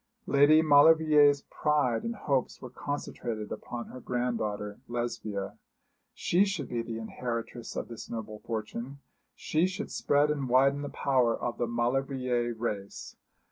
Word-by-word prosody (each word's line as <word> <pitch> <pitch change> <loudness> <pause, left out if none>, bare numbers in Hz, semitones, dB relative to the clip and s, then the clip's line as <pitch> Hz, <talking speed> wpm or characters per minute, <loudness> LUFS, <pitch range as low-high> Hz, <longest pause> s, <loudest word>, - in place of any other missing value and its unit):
Lady 145 +3 +5
Maulevrier's 150 -1 +6
pride 145 -6 +1
and 230 0 -3
hopes 135 - -1
were 125 - -9
concentrated 120 -6 -4
upon 120 -1 -6
her 130 - -9
granddaughter 110 -5 -2
Lesbia. 110 -4 -4 0.6
She 180 +3 +3
should 195 -9 -2
be 120 -1 -1
the 115 -1 -5
inheritress 115 0 -5
of - - -3
this 115 - -9
noble 110 -2 -6
fortune 115 +5 -5 0.4
she 160 +4 +1
should 185 - -5
spread 145 +1 +2
and 140 -4 -2
widen 135 +3 +4
the 145 - -4
power 125 -4 +1
of 120 - -3
the 120 - 0
Maulevrier 125 0 0
race. 105 -3 -5
125 Hz, 140 wpm, -29 LUFS, 115-145 Hz, 0.6 s, Maulevrier's